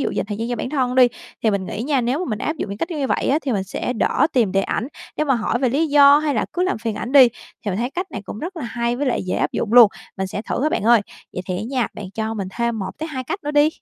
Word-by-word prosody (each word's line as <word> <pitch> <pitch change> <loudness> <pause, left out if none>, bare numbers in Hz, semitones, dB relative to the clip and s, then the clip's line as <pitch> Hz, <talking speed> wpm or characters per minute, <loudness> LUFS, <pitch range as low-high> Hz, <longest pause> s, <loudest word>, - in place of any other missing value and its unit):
dụ - - 0
dành - - -2
thời 205 -1 -4
gian 230 +2 -3
cho 245 - -2
bản 250 - -4
thân 255 -4 0
đi, 255 -1 +7 0.4
thì 220 - +3
mình 200 -2 -2
nghĩ 210 +4 -4
nha, 280 -1 +1
nếu 245 +4 0
mà 365 - -2
mình 215 - -2
áp 310 - -2
dụng 205 - -4
những 200 - -6
cách 330 - -2
như 320 - -3
như 275 - 0
vậy - - 0
á, 280 - +3
thì 270 - -1
mình 195 -3 -1
sẽ 200 +5 -3
đỡ 255 +4 +2
tìm 230 -7 +2
để 195 - +3
ảnh 230 +6 -2 0.3
nếu 305 - 0
mà 270 - +3
hỏi 230 +1 0
về 260 - +2
lý 290 +7 +1
do 285 -1 +7
hay 300 -2 0
là - - +1
cứ 360 - 0
làm 370 - 0
phiền 225 -2 -3
ảnh 245 +5 -5
đi. 265 -4 +8 0.4
Thì 205 - -1
mình 185 - -2
thấy 245 +3 -1
cách 360 +6 -3
này 205 - -6
cũng - - -7
rất 350 - -6
là 315 - -5
hay 235 0 -2
với 285 - -1
lại 250 - 0
dễ 185 - -1
áp - - 0
dụng 220 - -2
luôn, 240 -3 +9 0.3
mình 190 - -2
sẽ 200 +2 -5
thử 250 - -3
á 305 - +3
bạn 310 - -1
ơi. 235 0 +5 0.3
Vậy 180 - -4
thì 180 - -1
á 190 - -4
nha, 255 -4 +1
bạn 195 -3 -7
cho 220 0 -2
mình 195 -3 -4
thêm 235 -1 0
1 190 -2 -3
tới 315 +1 -4
2 260 -4 -5
cách 390 +6 -5
nữa 295 - -1
đi. 295 0 +4
245 Hz, 340 wpm, -21 LUFS, 215-285 Hz, 0.4 s, luôn